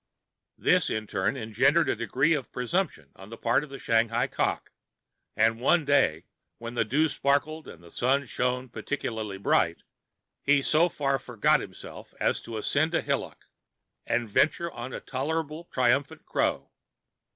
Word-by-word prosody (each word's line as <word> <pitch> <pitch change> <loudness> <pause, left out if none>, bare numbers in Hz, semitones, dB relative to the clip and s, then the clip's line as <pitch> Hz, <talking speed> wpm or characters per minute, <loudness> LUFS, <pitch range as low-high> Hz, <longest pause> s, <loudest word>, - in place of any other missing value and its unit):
This, - - +3
in 110 0 -2
turn, 100 +6 -1
engendered 130 +8 +2
a - - +1
degree 135 +7 +1
of 135 -7 -3
presumption 125 - -2
on 95 +2 -13
the 115 - -9
part 120 +5 +2
of 150 - -9
the 135 - -7
Shanghai 115 0 +1
cock; - - -2 0.6
and 115 +1 +3
one 160 +4 +3
day, 115 - +2 0.3
when 115 0 -7
the 120 - +1
dew 140 +9 +2
sparkled 150 +2 0
and 85 - -12
the 85 - -14
sun 135 +3 +1
shone 125 +1 -1
peculiarly 110 -5 -4
bright,[Pg 95 - +1 0.6
48] 140 - +6
he 140 - +2
so 165 +5 +4
far 135 -4 0
forgot 120 -4 +2
himself - - -10
as - - +1
to 115 -1 -6
ascend 155 +9 +1
a - - +2
hillock - - -3 0.6
and 120 -1 0
venture 155 +10 +1
on 120 +2 -7
a - - -5
tolerably 155 +4 -3
triumphant 135 +5 +1
crow. - - -1
130 Hz, 160 wpm, -27 LUFS, 115-150 Hz, 0.6 s, 48